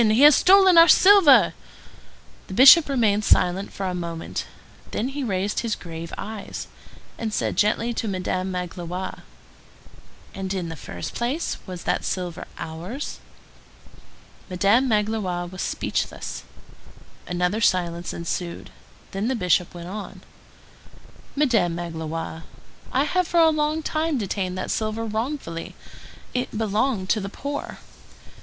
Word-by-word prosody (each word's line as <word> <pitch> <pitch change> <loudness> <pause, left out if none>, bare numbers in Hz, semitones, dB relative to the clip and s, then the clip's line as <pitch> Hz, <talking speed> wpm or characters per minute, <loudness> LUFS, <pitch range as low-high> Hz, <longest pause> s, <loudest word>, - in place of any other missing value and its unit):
He 220 +4 +4
has 295 -1 +9
stolen 375 -2 +6
our 330 - +9
silver!" 375 -9 +7 0.9
The 190 - -7
Bishop 280 - +8
remained 215 -6 +2
silent 190 0 +2
for 195 - -5
a 185 - -2
moment; 170 -2 -5 0.4
then 245 - -2
he 280 +1 -4
raised 200 -2 -1
his 230 -3 -1
grave 165 -1 -8
eyes, 215 -1 -6 0.5
and 225 -2 -2
said - - -1
gently 225 +3 +1
to 225 - -3
Madame 185 -1 -2
Magloire:— 180 0 -5 1.1
"And, 190 -1 -5
in 175 -3 -3
the 165 - -6
first 85 - -7
place, 255 +8 -2
was 180 -2 -7
that - - -1
silver 180 -3 -4
ours?" 175 - -6 1.3
Madame 200 +8 +3
Magloire 210 -5 0
was 185 +1 -7
speechless. - - -3 0.8
Another 180 +4 -1
silence 175 -4 +1
ensued; 170 +1 -5 0.4
then 195 +3 -2
the 260 - 0
Bishop 180 -4 +1
went 175 0 -8
on:— 210 +2 -7 1.1
"Madame 230 - +2
Magloire, 165 -1 -5 0.5
I 265 - +2
have 365 +4 0
for 345 - +2
a 325 -1 +6
long 305 +1 0
time 310 -1 -1
detained 190 -4 -3
that 185 - -3
silver 220 +1 -2
wrongfully. 220 - -4 0.6
It 250 -3 -3
belonged 215 -1 0
to 220 - +2
the 195 -1 -5
poor. 285 +7 -5
205 Hz, 130 wpm, -23 LUFS, 180-255 Hz, 1.3 s, has